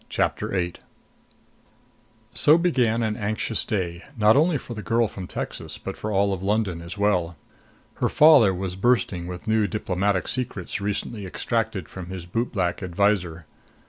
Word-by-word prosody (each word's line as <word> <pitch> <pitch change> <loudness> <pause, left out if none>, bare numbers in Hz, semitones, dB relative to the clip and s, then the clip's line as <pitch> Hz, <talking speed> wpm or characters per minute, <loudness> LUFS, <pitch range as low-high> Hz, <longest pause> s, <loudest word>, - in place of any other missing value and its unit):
CHAPTER - - 0
VIII 90 -2 -1 1.6
So 155 +2 +5
began 125 -10 +2
an 110 -1 0
anxious 110 +2 -2
day, 85 -4 -2 0.2
not 110 0 +5
only 155 +2 +3
for 125 - -8
the 110 - -6
girl 115 +2 +1
from 95 -2 -8
Texas - - -5
but - - -6
for 110 - -4
all 100 0 +2
London 100 -3 -1
as 85 +4 -8
well. 90 -5 +1 0.6
Her - - +1
father 145 -10 +7
was 95 0 -4
bursting 95 -5 +1
with 90 +4 -8
new 110 -1 +2
diplomatic 95 -1 -1
secrets 105 -6 -2
recently 100 0 -3
extracted 110 -2 -2
from 90 -2 -8
his 90 -2 -7
bootblack 95 -2 -1
adviser. 90 -3 0
100 Hz, 145 wpm, -24 LUFS, 90-115 Hz, 1.6 s, father